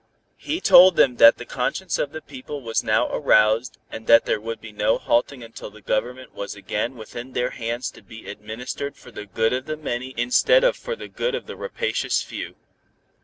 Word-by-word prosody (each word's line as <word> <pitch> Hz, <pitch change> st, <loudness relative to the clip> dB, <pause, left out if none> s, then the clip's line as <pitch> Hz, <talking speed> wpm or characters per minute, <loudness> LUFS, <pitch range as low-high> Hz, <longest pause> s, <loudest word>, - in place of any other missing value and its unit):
He 310 Hz, +3 st, -3 dB
told 185 Hz, -, +7 dB
them 125 Hz, -3 st, +3 dB
that 115 Hz, -, +8 dB
the 120 Hz, -, -8 dB
conscience 150 Hz, +9 st, -2 dB
of 145 Hz, -, -1 dB
the 155 Hz, 0 st, -8 dB
people 140 Hz, +1 st, -9 dB
was 115 Hz, -1 st, -1 dB
now -, -, +2 dB
aroused, 110 Hz, +3 st, +2 dB
and 110 Hz, 0 st, -8 dB
that 115 Hz, 0 st, +6 dB
there 105 Hz, -, -1 dB
would 115 Hz, +1 st, -5 dB
be 110 Hz, -, -11 dB
no 105 Hz, +1 st, +1 dB
halting 120 Hz, +2 st, 0 dB
until 115 Hz, -2 st, -10 dB
the 105 Hz, +1 st, -16 dB
Government 125 Hz, +4 st, -3 dB
was 100 Hz, -, -6 dB
again 105 Hz, +5 st, -3 dB
within 120 Hz, +3 st, -9 dB
their 125 Hz, +1 st, -1 dB
hands 120 Hz, +1 st, -4 dB
to -, -, -16 dB
be 110 Hz, 0 st, -13 dB
administered 115 Hz, +6 st, -6 dB
for 125 Hz, -, -15 dB
the 105 Hz, -2 st, -9 dB
good 110 Hz, +4 st, 0 dB
of 130 Hz, +1 st, -3 dB
the 155 Hz, 0 st, -3 dB
many 130 Hz, -3 st, -5 dB
instead 280 Hz, -, +3 dB
of -, -, +3 dB
for -, -, -5 dB
the -, -, -9 dB
good 485 Hz, -1 st, -2 dB
of -, -, -6 dB
a -, -, -7 dB
rapacious 485 Hz, 0 st, -2 dB
few. -, -, -7 dB
125 Hz, 205 wpm, -23 LUFS, 115-140 Hz, -, that